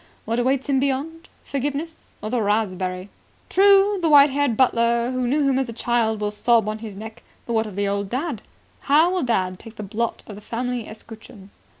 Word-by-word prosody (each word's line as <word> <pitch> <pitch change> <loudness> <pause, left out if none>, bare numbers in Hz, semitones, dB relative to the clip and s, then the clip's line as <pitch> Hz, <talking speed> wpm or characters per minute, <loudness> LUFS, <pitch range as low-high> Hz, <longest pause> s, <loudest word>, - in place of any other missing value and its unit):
What 230 +2 -1
awaits 260 +2 0
him 275 -2 +2
beyond? 285 +5 -3
Forgiveness? 290 +4 -5
Or 215 - -4
the 245 -2 0
raspberry? 190 -3 -1 0.4
True, 395 +1 +5
the 330 - +2
white 290 -1 +7
haired 280 -5 0
butler 235 -1 +2
who 255 -1 -1
knew 285 +2 +1
him 265 -1 +2
as 265 -3 -2
a - - -5
child 225 -2 0
will 210 0 -1
sob 225 +1 +2
on 215 0 -3
his 215 -3 -8
neck, 220 +3 -9 0.2
but 235 - -4
what 220 -1 +1
of 205 - -9
the 200 0 -1
old 200 0 -2
dad? 265 0 -3 0.5
How 315 +5 +5
will 370 -1 0
dad 185 - -1
take 225 -1 -12
the 210 - -7
blot 220 +4 -3
of 210 - -9
the 205 - -11
family 245 +1 -4
escutcheon?" 215 -2 -12
235 Hz, 205 wpm, -22 LUFS, 215-275 Hz, 0.5 s, white